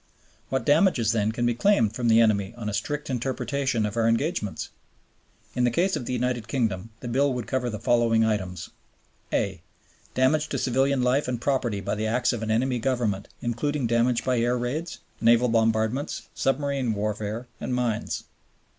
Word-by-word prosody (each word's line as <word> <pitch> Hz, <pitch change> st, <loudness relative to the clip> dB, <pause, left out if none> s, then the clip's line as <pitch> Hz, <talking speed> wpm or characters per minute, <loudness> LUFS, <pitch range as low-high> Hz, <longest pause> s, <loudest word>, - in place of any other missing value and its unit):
What 130 Hz, -3 st, -1 dB
damages, 145 Hz, -, +4 dB
then, 110 Hz, -1 st, +1 dB
can 120 Hz, +1 st, -1 dB
be 120 Hz, -, +2 dB
claimed 120 Hz, -, +3 dB
from 120 Hz, +1 st, -1 dB
the 115 Hz, 0 st, +6 dB
enemy 105 Hz, -1 st, +2 dB
on 115 Hz, -3 st, -5 dB
a 105 Hz, -, -2 dB
strict 145 Hz, +7 st, -2 dB
interpretation 130 Hz, -1 st, -1 dB
of 105 Hz, -, -3 dB
our 115 Hz, -1 st, +2 dB
engagements? 115 Hz, -, -1 dB, 0.8 s
In 125 Hz, -, 0 dB
the 120 Hz, -, +4 dB
case 180 Hz, +10 st, +1 dB
of 120 Hz, -, -4 dB
the -, -, -2 dB
United 125 Hz, -2 st, -1 dB
Kingdom 115 Hz, -5 st, -1 dB
the 125 Hz, -, -6 dB
bill 135 Hz, +4 st, +2 dB
would 125 Hz, -3 st, -3 dB
cover 130 Hz, -2 st, -1 dB
the 110 Hz, -, -4 dB
following 115 Hz, 0 st, +3 dB
items: 95 Hz, -5 st, -2 dB, 0.6 s
(a) 95 Hz, -4 st, -1 dB, 0.5 s
Damage 150 Hz, +4 st, +2 dB
to -, -, -2 dB
civilian 135 Hz, +1 st, +1 dB
life 125 Hz, +3 st, +2 dB
and 125 Hz, -2 st, -2 dB
property 120 Hz, -6 st, 0 dB
by -, -, -2 dB
the 110 Hz, +1 st, -1 dB
acts 120 Hz, +3 st, +1 dB
of 120 Hz, -, -4 dB
an 110 Hz, -, -3 dB
enemy 125 Hz, +3 st, +1 dB
Government 115 Hz, -6 st, -1 dB, 0.2 s
including 130 Hz, +4 st, -1 dB
damage 115 Hz, +1 st, +1 dB
by 125 Hz, -2 st, +2 dB
air 120 Hz, +2 st, +1 dB
raids, 145 Hz, +8 st, -3 dB, 0.2 s
naval 120 Hz, +2 st, +5 dB
bombardments, 115 Hz, +4 st, 0 dB
submarine 135 Hz, -3 st, 0 dB
warfare, 105 Hz, +3 st, -3 dB
and 125 Hz, -, -2 dB
mines. 120 Hz, -3 st, -1 dB
120 Hz, 175 wpm, -26 LUFS, 110-130 Hz, 0.8 s, the